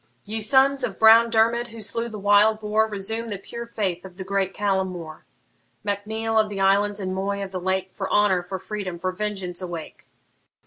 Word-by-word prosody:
Ye 220 +2 -4
sons 270 +5 +4
of - - -3
brown 225 +1 +7
Dermid, 230 +1 +2
who 230 -1 -11
slew 230 +3 -2
the 215 - -7
wild 205 +2 +4
boar, 215 +1 +1
Resume 220 +3 -4
the 205 - -3
pure 235 +4 -8
faith 190 -6 -2
of 185 -2 -12
the 190 - -5
great 195 0 -1
Callum 195 -2 0
More! 170 -4 -8 0.6
Mac 205 0 -3
Neil 220 0 0
of 215 -1 +2
the 200 -1 -5
islands, 200 +2 +2
and 185 -1 -3
Moy 200 +1 -2
of 190 - -7
the 185 -1 -4
Lake, 190 +1 -1
For 195 -1 -4
honour, 205 -3 +3
for 185 +2 -5
freedom, 190 -2 -5
for 185 +2 -2
vengeance 190 -2 -4
awake! 175 -3 -7
205 Hz, 205 wpm, -24 LUFS, 190-220 Hz, 0.6 s, brown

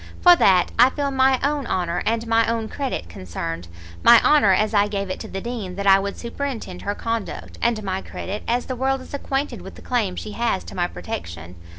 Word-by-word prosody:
For 355 -1 +8
that, 190 - +4
I 250 - +8
feel 280 0 -2
my 265 -1 +3
own 285 -2 0
honour 175 -1 -1
and 225 +1 0
my 230 0 +3
own 230 -1 -1
credit 270 - -4
concerned; 85 -1 -6 0.3
my 235 -1 +8
honour, 290 -10 +5
as 210 +3 +2
I 205 0 +4
gave 200 -2 -3
it - - -4
to - - -7
the 195 - -5
Dean 220 -6 -5
that 200 +1 -4
I 195 0 +7
would 200 0 -4
superintend 235 -6 -5
her 205 +1 -3
conduct, 230 -1 -4
and 230 -2 +1
my 190 -1 -2
credit, 200 +2 -6
as 245 +1 0
the 255 - -4
world 265 +1 0
is - - -13
acquainted 280 0 -3
with - - -10
the - - -14
claim 220 -7 -1
she 215 - -6
has 230 -3 -1
to - - -10
my 175 -1 0
protection." 85 - -7
220 Hz, 220 wpm, -22 LUFS, 190-255 Hz, 0.3 s, For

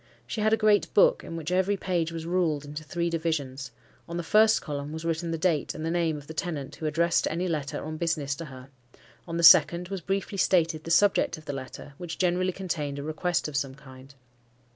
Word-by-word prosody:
She 220 - -4
had 215 +1 +2
a 220 - +4
great 215 -1 +3
book, - - +5
in 165 - -7
which 165 +1 -4
every 190 +2 +2
page 175 -3 -1
was 165 -1 -6
ruled 165 -5 0
into 150 +2 -7
three 170 +2 -2
divisions; 145 -5 -2 0.4
on 170 - -4
the 175 - -3
first 215 +5 +4
column 145 0 -5
was 160 +1 -6
written 165 +1 -1
the 165 - -2
date 160 -3 0
and 155 - -5
the 165 - -1
name 165 -3 0
of 145 - -10
the 160 - -8
tenant 155 -5 -4
who 155 - -3
addressed 170 +2 +2
any 175 +3 -2
letter 150 -5 -3
on 155 0 -5
business 155 -4 -1
to 165 - -6
her; 130 -2 -11 0.6
on 165 0 -3
the 170 - -1
second 170 +1 +7
was 195 -2 -4
briefly 195 +2 -3
stated 165 -4 +2
the - - -5
subject 200 +2 +3
of 155 - -14
the 145 - -4
letter, 135 +1 -8
which 175 -2 -6
generally 185 0 +1
contained 160 -7 -4
a 140 - -5
request 155 +3 -1
of 150 - -7
some 135 -2 -2
kind. 135 0 -15
165 Hz, 225 wpm, -27 LUFS, 150-180 Hz, 0.6 s, second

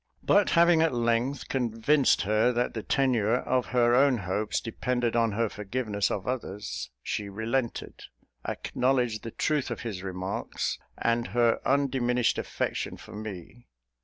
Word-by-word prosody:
But 205 -1 +4
having 170 -1 +6
at 160 -5 +2
length 120 +3 0
convinced 130 +3 +2
her 110 +4 +3
that 120 +1 0
the 110 - -3
tenure 120 -3 +2
of 125 0 0
her 120 -1 +3
own 135 0 +5
hopes 105 +2 -1
depended 120 +1 -1
on 115 -2 +2
her 115 +2 +1
forgiveness 105 -1 -2
of 95 - -3
others, 105 - -4
she 105 -1 -3
relented, 115 +4 -3 0.4
acknowledged 125 -4 0
the 115 - -6
truth 150 +4 -1
of - - -4
his 105 -6 -5
remarks, 95 0 -3 0.2
and 115 +1 0
her 120 -1 +4
undiminished 130 -3 +2
affection - - -3
for - - -12
me. 105 +2 -8
120 Hz, 140 wpm, -28 LUFS, 105-130 Hz, 0.4 s, having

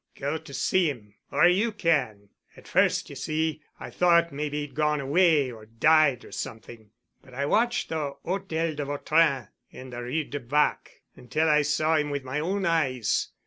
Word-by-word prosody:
"Go 145 +3 -3
to - - -14
see 180 +6 +1
him—or 110 +5 -1
you 200 +6 +2
can. 130 - -1 0.3
At - - -15
first, - - +2
ye - - -8
see, 155 0 -2 0.2
I - - -8
thought 170 -2 +3
maybe 150 +1 -3
he'd 145 -2 -7
gone 150 +1 +1
away 145 -1 +3
or 110 -2 -12
died 140 +3 +3
or - - -14
something. 110 -1 -8 0.3
But 130 -2 -16
I 140 +2 -1
watched 240 +9 +1
the 150 -4 -3
Hôtel 165 -4 -2
de 145 - -2
Vautrin 145 -2 +1 0.2
in 130 0 -11
the 120 0 -6
Rue 125 +6 -2
de 145 0 -6
Bac 145 +4 -1
until 155 +6 -1
I 150 -1 +4
saw 155 +2 +1
him 150 -1 0
with 140 -1 -3
my 130 +3 -3
own 195 +5 -1
eyes. 135 - +1
150 Hz, 180 wpm, -26 LUFS, 130-160 Hz, 0.3 s, I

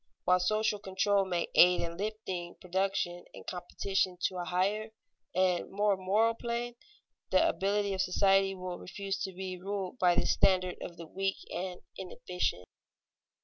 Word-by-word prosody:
While 180 0 +5
social 215 +3 +1
control 195 0 +1
may 175 -2 -1
aid 180 +1 +7
in 170 0 -3
lifting 190 -3 -4
production 185 -2 -1
and - - -11
competition 185 +1 -1
to 185 - 0
a 175 - -3
higher 200 +5 0 0.5
and 185 -1 +2
more 205 0 +2
moral 205 +5 +2
plane, 235 +1 -3 0.6
the 330 - +4
ability 200 -5 +1
of 190 - 0
society 195 +1 +3
will 180 -1 -5
refuse 195 +1 -4
to 195 - -2
be 185 0 -6
ruled 195 +3 -4
by 175 -1 +4
the - - +2
standards 185 -1 +3
of 170 - -7
the 170 - -8
weak 195 +3 -2
and 180 0 -4 0.2
inefficient. 180 - -3
190 Hz, 150 wpm, -31 LUFS, 180-200 Hz, 0.6 s, aid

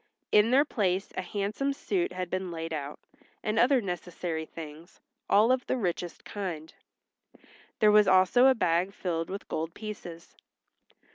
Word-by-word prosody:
In 210 +2 +5
their 275 +4 +5
place 195 -8 -1
a - - -1
handsome 205 +9 -2
suit 355 +5 -1
had 185 0 -4
been 185 0 -2
laid 165 -1 -5
out, 145 -1 -5 0.4
and 215 +1 0
other 260 +2 +5
necessary 175 -3 -4
things, 160 +2 -10 0.3
all 215 +4 +5
of 255 -1 0
the - - 0
richest 175 -5 -3
kind. 170 -6 -5 1.0
There 215 -1 +5
was 210 -1 +6
also 190 +7 +5
a 265 - +5
bag 180 -1 +1
filled 165 -3 -2
with 195 +1 -6
gold 165 +1 -4
pieces. 185 -6 -8
185 Hz, 150 wpm, -28 LUFS, 170-215 Hz, 1.0 s, was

